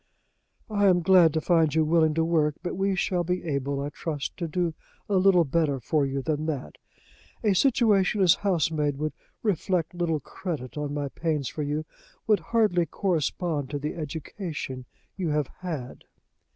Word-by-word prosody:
"I 205 -1 +3
am 180 -2 +4
glad 180 -3 +6
to 160 - +1
find 160 -3 +3
you 160 -1 +3
willing 160 -1 +3
to 165 - +2
work; 155 -3 +2
but 175 - -3
we 195 +1 +1
shall 180 -1 0
be 180 +1 -2
able, 140 -3 -2
I 145 - -3
trust, 150 -1 -4
to 170 - -3
do 170 +1 -1 0.3
a 200 - +2
little 185 -2 +5
better 145 -1 +1
for 140 +4 +1
you 135 0 -3
than 155 +1 -1
that. 135 - -4 0.6
A 210 -3 +3
situation 210 -3 +3
as 180 -3 +7
housemaid 155 -7 0
would 155 0 -2 0.3
reflect 180 -5 0
little 170 -3 0
credit 150 -3 -6
on 150 -1 -3
my 145 -1 -2
pains 150 -4 -2
for 155 - -5
you 150 +2 -2 0.4
would 215 -2 +4
hardly 210 -7 +1
correspond 160 -4 -1
to 145 - -3
the 150 +2 -3
education 155 -3 -5 0.3
you 180 -4 -1
have 150 -2 0
had." 155 -9 -6
160 Hz, 170 wpm, -26 LUFS, 150-180 Hz, 0.6 s, as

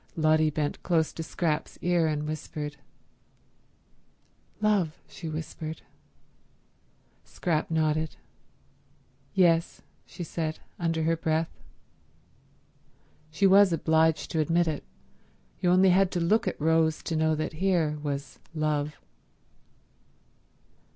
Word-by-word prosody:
Lotty 155 -1 +3
bent 150 -1 -2
close 160 -3 +1
to - - -5
Scrap's 160 -1 -2
ear, 175 -2 +2
and 150 -1 -1
whispered. 150 -1 -5 1.8
"Love," 205 -7 +1
she 165 - -7
whispered. 155 0 -6 1.4
Scrap 170 0 -2
nodded. 155 -1 0 1.2
"Yes," 170 -3 +2 0.2
she 175 - -7
said, 160 -1 -3 0.2
under 165 -2 0
her 165 +1 +2
breath. 160 0 -1 1.7
She 175 +6 +1
was 195 0 +7
obliged 160 -1 +2
to 160 - 0
admit 170 +2 +2
it. 155 -2 -2 0.8
You 180 - +1
only 185 +1 +5
had 190 +1 +4
to 180 - 0
look 190 +7 +2
at - - -2
Rose 160 0 +2
to 165 - -2
know 160 0 +2
that 155 +1 -3
here 165 -6 +1
was 140 -1 -4 0.2
Love. 150 -1 -1
160 Hz, 110 wpm, -27 LUFS, 155-170 Hz, 1.8 s, was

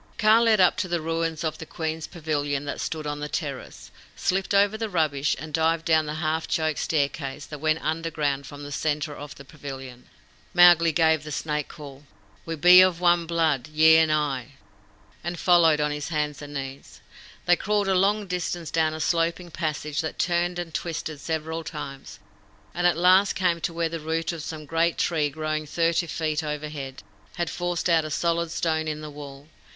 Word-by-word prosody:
Kaa 215 +1 +5
led 225 -2 +4
up 180 -1 +4
to 185 - -1
the 175 -1 -1
ruins 165 0 -2
of 160 -2 -3
the 160 - -7
queens' 160 -1 -4
pavilion 145 -4 -2
that 145 - -4
stood 155 -2 -4
on 145 0 -3
the 150 0 -5
terrace, 145 -3 -6 0.2
slipped 190 +1 -1
over 200 +1 +4
the 220 0 -3
rubbish, 150 -6 +1
and 155 +1 -8
dived 160 +1 +1
down 160 -2 +3
the 150 - -4
half 160 0 -1
choked 155 -2 0
staircase 145 -1 -2
that 150 - -9
went 155 0 +1
underground 155 -4 -1
from 145 0 -9
the 145 - -8
centre 150 0 -2
of 145 0 -9
the 140 - -13
pavilion. 135 -3 -9 0.5
Mowgli 175 -2 +7
gave 160 -1 +3
the 150 - -8
snake 150 0 -2
call, 145 -3 -11 0.4
"We 165 - -2
be 180 +4 +8
of 185 -2 +3
one 175 -1 +3
blood, 160 -6 +1
ye 160 +1 +6
and 160 -1 +4
I," 145 -5 -1 0.7
and 175 +1 -4
followed 165 -4 +4
on 150 0 +1
his 150 -1 -4
hands 150 -3 -2
and 145 0 -9
knees. 135 0 -7 0.5
They 175 - +5
crawled 205 +1 0
a 195 - +2
long 200 +3 +2
distance 175 -2 -3
down 160 -1 +1
a - - -6
sloping 170 +2 0
passage 155 -2 -2
that 160 - -5
turned 175 0 0
and 175 -2 -5
twisted 160 -3 -4
several 160 +1 -3
times, 135 -3 -8 0.6
and 175 0 +2
at 170 -3 +2
last 185 +3 +5
came 175 -3 +1
to 170 - -1
where 165 0 -1
the 165 0 -5
root 160 +2 -2
of 165 -2 -6
some 155 0 -7
great 165 +3 +1
tree, 155 -4 +1
growing 155 +1 -3
thirty 170 +2 +1
feet 155 +1 -2
overhead, 150 -3 -5 0.3
had 175 -1 -2
forced 175 -1 -2
out 165 -2 +3
a 155 - -5
solid 170 +2 0
stone 160 -1 -1
in 155 0 -3
the 150 -1 -7
wall. 145 -1 -10
160 Hz, 190 wpm, -25 LUFS, 150-170 Hz, 0.7 s, be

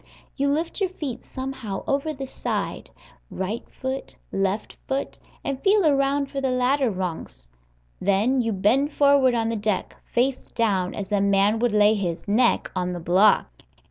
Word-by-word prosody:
You 280 0 +1
lift 325 +7 -1
your 380 - +2
feet 275 -10 -5
somehow 260 -7 -5
over 280 +3 0
the 270 -2 -6
side, 265 - -4 0.4
right 190 +5 -3
foot, 260 +1 -5 0.2
left 195 +2 -1
foot, 270 +1 -3 0.2
and 275 -1 -3
feel 400 -2 +4
around 280 -1 +2
for 275 - -3
the 265 - 0
ladder 255 +1 +2
rungs. 175 - -5 0.5
Then 210 +7 +2
you 230 -1 -1
bend 235 +9 +2
forward 280 -3 +4
on 225 -1 0
the 230 - -1
deck, 210 -3 -2 0.2
face 255 +2 +1
down, 195 -6 0
as 205 0 -6
a 205 -1 +2
man 200 +2 +3
would 240 0 +2
lay 210 0 +5
his 180 -5 -3
neck 235 +4 +2
on 180 -1 -1
the 175 - -4
block. 185 +5 +3
235 Hz, 165 wpm, -24 LUFS, 200-275 Hz, 0.5 s, lay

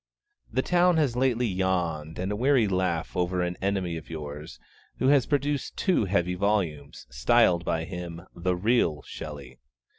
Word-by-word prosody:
The 130 - 0
town 180 -1 +3
has 140 -7 +1
lately 125 -1 +2
yawned 90 -6 -1
a 95 +3 -2
weary 125 0 +3
laugh 90 -3 -1
over 90 0 0
an 90 0 -2
enemy 95 -3 -1
of 80 - -10
yours, 75 -1 -7 0.4
who 130 - +2
has 140 -3 +4
produced 145 -1 -1
two 185 - +2
heavy 90 -2 +1
volumes, 90 -7 -1
styled 60 +8 +3
by 80 -1 -1
him 85 -1 -7
'The 90 +1 0
Real 90 -6 +1
Shelley.' 70 -5 -9
90 Hz, 150 wpm, -27 LUFS, 85-120 Hz, 0.4 s, has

